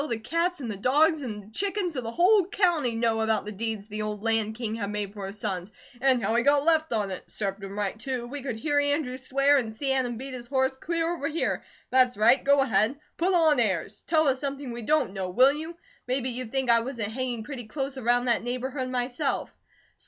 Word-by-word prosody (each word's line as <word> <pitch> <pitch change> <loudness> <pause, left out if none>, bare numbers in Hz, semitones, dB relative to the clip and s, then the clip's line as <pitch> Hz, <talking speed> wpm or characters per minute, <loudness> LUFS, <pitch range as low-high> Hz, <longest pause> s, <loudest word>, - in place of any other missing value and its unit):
The 230 - -1
cats, 335 +10 -1
and 240 -5 -4
the 200 - -5
dogs, 300 - +3
and 215 -6 -5
the 210 - -17
chickens 390 - -1
of 255 - -3
the 225 - -4
whole 370 - +4
county 340 - +1
know 225 -1 +1
about 220 -2 +1
the 210 - -5
deeds 215 0 -4
the 215 0 -5
old 210 -1 -4
Land 225 -1 +1
King 225 -2 -3
had 210 -3 -3
made 205 -1 -3
for 200 -2 -6
his 200 +2 -7
sons; 190 -2 -2 0.3
and 260 -3 +3
how 220 - +1
he 235 - +3
got 285 +2 +3
left 320 -1 +2
on 210 -4 0
it. 185 - -7
Served 200 -1 -3
him 195 +1 -7
right, 205 +1 -2
too! 250 0 -3
We 280 +4 -6
could 255 -3 -4
here 290 +5 +1
Andrew 285 -3 0
swear, 275 +2 +3
and 235 -5 -1
see 270 +5 0
Adam 250 -3 0
beat 265 +2 -7
his 240 -1 -8
horse, 265 0 +1
clear 335 +4 -1
over 285 -4 -3
here! 325 +1 -1 0.3
That's 250 -2 +4
right! 230 +5 +5
Go 280 0 +4
ahead! 230 +2 +1 0.2
Put 365 +2 +2
on 315 -5 +4
airs! 200 -1 -1
Tell 315 -2 +3
us 265 -1 +2
something 275 -2 -4
we 235 0 -6
don't 265 -3 +1
KNOW, 190 -2 -3
will 255 +9 +5
you? 320 +3 -5 0.3
Maybe 255 0 0
you 250 +1 -4
think 260 +1 0
I 230 - +6
wasn't 230 -3 -3
hanging 245 -3 -3
pretty 245 -2 -7
close 270 +3 -4
around 245 -1 +1
that 235 -2 +2
neighbourhood, 255 +2 -3
myself!" 255 +3 -2
250 Hz, 230 wpm, -27 LUFS, 220-285 Hz, 0.3 s, I